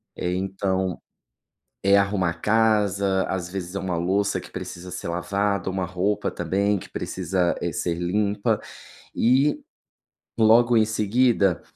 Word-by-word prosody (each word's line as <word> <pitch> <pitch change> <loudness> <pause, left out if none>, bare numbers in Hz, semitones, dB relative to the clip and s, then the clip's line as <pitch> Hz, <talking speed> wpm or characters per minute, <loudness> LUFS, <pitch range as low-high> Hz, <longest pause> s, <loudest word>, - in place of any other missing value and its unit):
Eh, 90 0 -2
então, 95 -1 -2 0.8
é 100 +1 +5
arrumar 100 -3 +1
a - - -3
casa. 100 -1 +2
Às 90 -2 -3
vezes, 90 -1 -5
é 100 - -2
uma 90 -3 -2
louça, 100 +4 0
que - - -12
precisa 90 +1 -7
ser - - -6
lavado. 100 +3 -1
Uma 95 -1 -2
roupa 95 +3 -1
também, 100 +4 0
que - - -9
precisa, 90 -2 -1
eh, - - -2
ser 85 -1 -1
limpa. 100 +4 0 0.6
E, 135 +5 +3 0.8
logo 115 +2 +5
em 110 - +5
seguida 110 -3 +2
100 Hz, 140 wpm, -24 LUFS, 90-105 Hz, 0.8 s, é